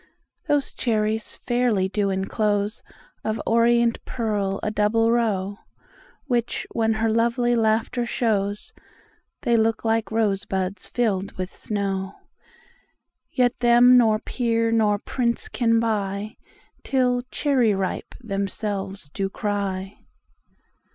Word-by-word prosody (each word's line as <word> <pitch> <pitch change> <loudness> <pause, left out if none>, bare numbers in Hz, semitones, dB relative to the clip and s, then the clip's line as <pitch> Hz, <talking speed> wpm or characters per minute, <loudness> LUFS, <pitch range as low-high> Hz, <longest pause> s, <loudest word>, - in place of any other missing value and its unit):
Those 290 -2 +1
cherries 220 -2 -1
fairly 240 -6 +1
do 200 +1 0
encloseOf 205 +2 -2
orient 235 0 +3
pearl 205 -4 -2
a 210 - 0
double 220 +2 +2
row, 205 -4 0 0.7
Which 245 -4 -1
when 225 -1 +1
her 220 +1 0
lovely 235 +2 +2
laughter 230 +2 +1
shows, 205 -4 -1 0.7
They 240 -3 +3
look 225 0 +1
like 225 0 +1
rose 215 -3 +1
buds 190 0 -3
fill'd 200 -5 -1
with 185 0 -5
snow; 195 -2 -3 1.1
Yet 250 -1 +1
them 240 +1 +6
nor 225 -3 +5
peer 230 0 0
nor 215 -2 +3
prince 235 -2 -1
can 230 -2 +2
buyTill 225 +4 -2
'Cherry 255 -8 +2
ripe' 190 -1 -3
themselves 195 -3 -4
do 195 -1 -2
cry. 195 -2 -3
220 Hz, 105 wpm, -24 LUFS, 200-235 Hz, 1.1 s, them